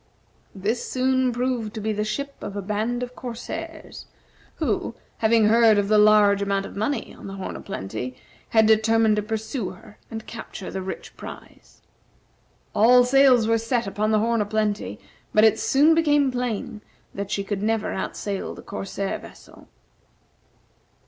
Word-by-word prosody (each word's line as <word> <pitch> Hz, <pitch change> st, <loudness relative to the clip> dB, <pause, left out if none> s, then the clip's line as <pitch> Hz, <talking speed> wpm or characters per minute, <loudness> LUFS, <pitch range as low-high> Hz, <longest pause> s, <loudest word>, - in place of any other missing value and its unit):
This 210 Hz, +5 st, -1 dB
soon 260 Hz, 0 st, +1 dB
proved 245 Hz, -2 st, -2 dB
to -, -, -3 dB
be 215 Hz, +1 st, -1 dB
the 210 Hz, 0 st, -1 dB
ship 280 Hz, +6 st, -3 dB
of 200 Hz, -, -6 dB
a 200 Hz, -, -2 dB
band 220 Hz, +5 st, -1 dB
of 250 Hz, 0 st, -7 dB
corsairs, 240 Hz, -1 st, -7 dB, 0.5 s
who, -, -, -2 dB, 0.2 s
having 225 Hz, 0 st, +4 dB
heard 225 Hz, 0 st, +5 dB
of 200 Hz, 0 st, +1 dB
the 215 Hz, -1 st, +5 dB
large 210 Hz, -1 st, +5 dB
amount 200 Hz, 0 st, 0 dB
of -, -, -10 dB
money 220 Hz, +8 st, -2 dB
on -, -, -11 dB
the 195 Hz, -, -7 dB
"Horn 190 Hz, -, -5 dB
o' -, -, -7 dB
Plenty," 125 Hz, -, -5 dB, 0.3 s
had 220 Hz, -1 st, +4 dB
determined 220 Hz, 0 st, +4 dB
to -, -, +2 dB
pursue 220 Hz, 0 st, -3 dB
her 210 Hz, +2 st, -14 dB
and 220 Hz, -1 st, -7 dB
capture 220 Hz, -4 st, -8 dB
the 190 Hz, -, -4 dB
rich 190 Hz, 0 st, -7 dB
prize. -, -, -12 dB, 0.9 s
All 240 Hz, +4 st, +6 dB
sails 255 Hz, -3 st, +5 dB
were 230 Hz, 0 st, +3 dB
set 230 Hz, +1 st, -1 dB
upon 205 Hz, +2 st, -1 dB
the 215 Hz, -, +3 dB
"Horn 230 Hz, +1 st, +1 dB
o' -, -, 0 dB
Plenty," 210 Hz, 0 st, -2 dB, 0.4 s
but 215 Hz, -, +6 dB
it 220 Hz, 0 st, +5 dB
soon 280 Hz, +8 st, +4 dB
became 295 Hz, -4 st, +3 dB
plain 240 Hz, -3 st, -3 dB, 0.3 s
that 200 Hz, 0 st, -5 dB
she 200 Hz, -, -1 dB
could 195 Hz, 0 st, -3 dB
never 220 Hz, 0 st, 0 dB
outsail 195 Hz, +1 st, -4 dB
the -, -, -11 dB
corsair 195 Hz, -1 st, -4 dB
vessel. -, -, -15 dB
220 Hz, 165 wpm, -24 LUFS, 205-240 Hz, 0.9 s, All